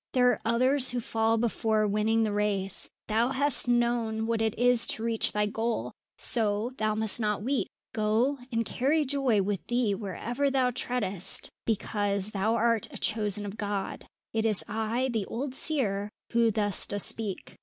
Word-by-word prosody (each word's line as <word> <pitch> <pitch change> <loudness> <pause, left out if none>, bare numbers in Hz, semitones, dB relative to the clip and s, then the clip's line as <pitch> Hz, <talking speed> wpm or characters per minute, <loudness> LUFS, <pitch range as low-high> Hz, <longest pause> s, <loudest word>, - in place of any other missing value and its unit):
There 250 -1 +5
are 230 - -3
others 255 +4 +3
who 245 - -1
fall 225 0 0
before 220 -2 +1
winning 215 +2 +1
the 215 - 0
race; 200 -2 -1 0.2
thou 225 +2 +1
hast 275 -1 +2
known 235 -2 +1
what 230 -1 0
it 220 -1 0
is 245 -1 +4
to 220 - -3
reach 230 -1 +2
thy 210 0 +1
goal; 210 - -2 0.3
so, 220 0 +1
thou 215 0 +1
must 220 +1 +3
not 210 -2 -1
weep. 265 +2 0 0.3
Go, 225 +6 +1
and 230 -1 0
carry 295 +7 +1
joy 260 -7 +1
with 200 -2 -2
thee 240 -4 +1
wherever 235 +7 -2
thou 260 -2 +2
treadest, 210 -7 -2 0.2
because 205 -2 0
thou 215 +3 0
art 230 -1 +1
a - - -8
Chosen 210 -2 0
of 205 +1 -7
God. 205 -2 -4 0.3
It 220 0 0
is 215 -4 +1
I, 225 +4 -1
the 215 -4 -2
old 260 +3 -4
seer, 210 -10 0 0.2
who 235 -1 +3
thus 205 -2 0
does 205 -1 0
speak." 210 -4 0
225 Hz, 170 wpm, -28 LUFS, 210-240 Hz, 0.3 s, There